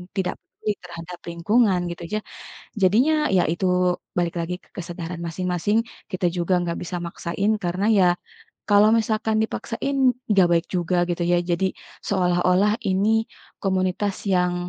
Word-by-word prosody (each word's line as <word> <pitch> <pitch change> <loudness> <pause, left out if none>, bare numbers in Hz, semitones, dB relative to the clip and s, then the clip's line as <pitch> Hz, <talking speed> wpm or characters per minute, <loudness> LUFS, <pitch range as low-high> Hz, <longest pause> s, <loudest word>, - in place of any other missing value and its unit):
tidak 185 -2 -1
peduli 210 - -5
terhadap 175 0 -8
lingkungan, 190 +3 +2
gitu 170 - -8
ya. 215 - +1 0.6
Jadinya, 230 +12 +4 0.2
ya 180 - +5
itu, 180 +3 -1 0.5
balik 175 0 0
lagi 170 +2 -2
ke - - -27
kesadaran 175 -1 -5
masing-masing, 180 +4 0 0.3
kita 185 0 0
juga 175 +2 0
enggak 170 -1 -2
bisa 175 +1 -4
maksain, 170 +4 -2
karena 180 +3 -1
ya, 185 - +5 0.6
kalau 205 +1 +6
misalkan 220 0 0
dipaksain, 240 +5 -3 0.3
enggak 195 -4 +5
baik 170 +1 +2
juga, 175 +1 0
gitu 175 0 -1
ya. 175 - +4
Jadi, 175 +2 +2 0.4
seolah-olah 180 +1 +3 0.2
ini, 195 +3 +2 0.5
komunitas 190 +1 0 0.2
yang, 180 -1 +2
180 Hz, 140 wpm, -23 LUFS, 175-205 Hz, 0.6 s, kalau